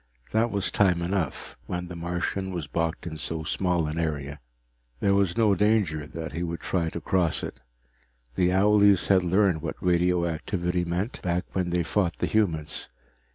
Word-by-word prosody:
That 115 +2 +2
was 100 -3 -1
time 90 -4 +3
enough, 90 -4 -2
when 90 0 -3
the 90 - -7
Martian 90 +3 -2
was 85 -5 -4
boxed 80 +3 -2
in 80 -2 -5
so 80 +1 -3
small 90 0 0
an 75 +2 -3
area. 70 -3 -3 0.6
There 100 - +3
was 100 -3 +2
no 110 -3 +4
danger 95 -7 +1
that 80 0 -6
he 80 - -4
would 85 -1 -3
try 85 -2 -1
to 85 - -5
cross 85 0 0
it. 60 - -6 0.7
The 90 +6 +2
owlies 100 0 +4
had 95 -2 +5
learned 90 -2 +2
what 80 - -4
radioactivity 90 0 0
meant, 90 +8 -3
back 90 0 -1
when 90 -2 0
they 85 0 +1
fought 90 0 0
the - - 0
humans. 80 -9 -1
90 Hz, 170 wpm, -26 LUFS, 80-95 Hz, 0.7 s, had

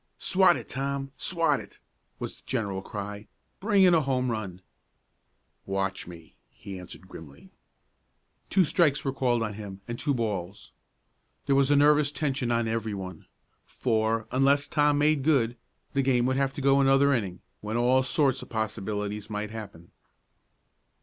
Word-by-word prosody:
"Swat 185 -2 +4
it, - - -9
Tom. 135 +1 -3
Swat 165 +1 +1
it!" - - -12 0.4
was - - -6
the - - -23
general 100 -6 -2
cry. 105 +1 -7 0.3
"Bring 200 -1 +3
in 180 -2 +6
a 165 - +4
home 130 -3 0
run!" 95 -5 -5 1.0
"Watch 95 -1 -2
me," 85 -2 -12 0.2
he 95 -2 -9
answered 90 +1 -12
grimly. 70 -6 -13 1.0
Two 190 - +4
strikes 150 -3 +2
were 135 - 0
called 120 -4 +1
on 105 -2 -3
him, 100 -2 -8
and 120 0 -5
two 145 -2 0
balls. 105 -5 -4 0.7
There 140 - +2
was 135 0 +3
a 145 - +5
nervous 145 0 +4
tension 140 -5 -1
on 115 -1 +1
everyone, 100 -6 -4 0.4
for, 110 -2 0
unless 140 +2 +3
Tom 145 -1 +2
made 150 0 +3
good, 130 -5 +2 0.4
the 140 - +2
game 125 -2 +2
would 130 +1 +1
have 135 0 0
to - - -6
go 140 0 +4
another 135 +1 +4
inning, 95 -8 -2 0.2
when 105 +2 -3
all 125 +2 +4
sorts 135 0 +1
of - - -11
possibilities 105 -1 -3
might 105 0 -4
happen. 100 -6 -9
120 Hz, 155 wpm, -27 LUFS, 105-140 Hz, 1.0 s, in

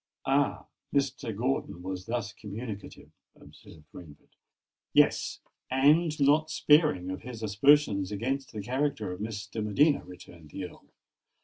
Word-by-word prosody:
"Ah! 140 +1 +1 0.3
Mr. 135 -6 -1
Gordon 120 -7 -2
was 95 0 -5
thus 115 -3 -3
communicative?" 105 0 -8 0.2
observed 80 - -16
Rainford. 75 -4 -13 0.6
"Yes—and 150 +4 +2
not 150 +3 +4
sparing 150 - +3
of 95 - -6
his 115 -2 -8
aspersions 105 -2 +3
against 130 +6 -2
the 105 -3 -6
character 130 -4 -1
of 90 - -7
Miss 105 -1 -4
de 110 +1 -5
Medina," 140 +8 +3
returned 90 -3 -13
the 95 - -6
Earl. 90 - -13
110 Hz, 125 wpm, -29 LUFS, 100-140 Hz, 0.6 s, not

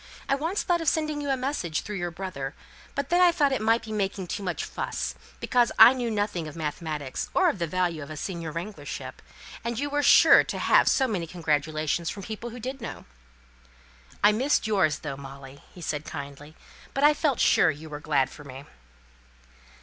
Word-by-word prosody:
I - - +2
once 325 +8 -1
thought 345 -2 +1
of 325 - -5
sending 305 -1 0
you 285 - -4
a 270 - +1
message 255 - -2
through 210 -1 -6
your 175 -1 -2
brother, 160 -6 -6 0.4
but 280 - -2
then 350 +1 +3
I 355 -1 +7
thought 295 -5 +2
it 265 - 0
might 225 +2 +2
be 220 - -8
making 195 -2 -2
too 180 - -4
much 180 -3 -3
fuss, - - -4 0.3
because 245 -1 +2
I 245 - +10
know 245 -3 -2
nothing 205 -6 -2
of 155 - -9
mathematics, 150 -3 -4
or 365 -1 +5
of 215 - -3
the 170 - -1
value 175 -1 -1
of 140 - -8
a 155 - -7
senior 170 -2 -4
wranglership; 180 +6 -7 0.4
and 235 -1 -3
you 285 +3 -2
were 290 0 +1
sure - - +7
to - - -5
have - - +4
so 265 - +3
many 185 -8 -2
congratulations 155 -1 -1
from 200 - -6
people 220 +4 -6
who 240 +1 -9
did 260 +3 -6
know." 230 - -7 1.2
"I 205 - +7
missed 255 +6 +1
yours 190 -9 +2
though, 140 -3 -6
Molly," 135 0 -11 0.2
said 155 -3 -3
he, - - -10
kindly. 145 +1 -8 0.4
"But 275 - 0
I 300 +1 +7
felt 295 -4 0
sure - - +5
you 155 +1 -5
were 150 -1 -7
glad 140 -3 +1
for 145 - -12
me." 135 0 -10
190 Hz, 205 wpm, -26 LUFS, 155-260 Hz, 1.2 s, I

